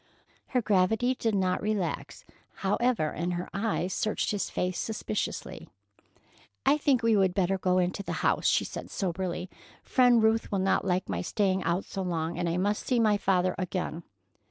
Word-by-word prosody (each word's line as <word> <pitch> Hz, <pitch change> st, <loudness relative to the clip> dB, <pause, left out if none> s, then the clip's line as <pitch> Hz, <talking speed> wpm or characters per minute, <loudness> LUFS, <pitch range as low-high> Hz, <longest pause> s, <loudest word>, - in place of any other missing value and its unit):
Her 250 Hz, -2 st, 0 dB
gravity 215 Hz, +5 st, +2 dB
did 225 Hz, -4 st, -1 dB
not 185 Hz, -2 st, +1 dB
relax, 210 Hz, -, -3 dB, 0.4 s
however, 205 Hz, -5 st, +1 dB
and 175 Hz, +2 st, -2 dB
her 175 Hz, +1 st, -3 dB
eyes 195 Hz, -3 st, -1 dB
searched 215 Hz, -, -1 dB
his 205 Hz, -2 st, -2 dB
face 180 Hz, 0 st, -2 dB
suspiciously. 215 Hz, -1 st, -4 dB, 1.0 s
"I 285 Hz, +3 st, +4 dB
think 265 Hz, -5 st, +2 dB
we 230 Hz, -1 st, +4 dB
would 190 Hz, -3 st, +2 dB
better 190 Hz, 0 st, +1 dB
go 185 Hz, 0 st, +2 dB
into 180 Hz, +2 st, 0 dB
the -, -, -4 dB
house," -, -, +2 dB
she -, -, +3 dB
said -, -, -7 dB
soberly. 185 Hz, -1 st, -3 dB, 0.4 s
"Friend 245 Hz, -3 st, +4 dB
Ruth 220 Hz, +1 st, +2 dB
will 200 Hz, -, +1 dB
not 190 Hz, 0 st, +1 dB
like 185 Hz, 0 st, 0 dB
my 85 Hz, -2 st, -2 dB
staying 190 Hz, -, 0 dB
out 175 Hz, +3 st, 0 dB
so 195 Hz, -, -5 dB
long, 170 Hz, -2 st, -2 dB
and 175 Hz, -, 0 dB
I 170 Hz, -, -1 dB
must 205 Hz, +3 st, -1 dB
see 250 Hz, -2 st, +2 dB
my 215 Hz, -2 st, +4 dB
father 185 Hz, -2 st, +1 dB
again." 180 Hz, -2 st, -3 dB
195 Hz, 175 wpm, -28 LUFS, 180-220 Hz, 1.0 s, I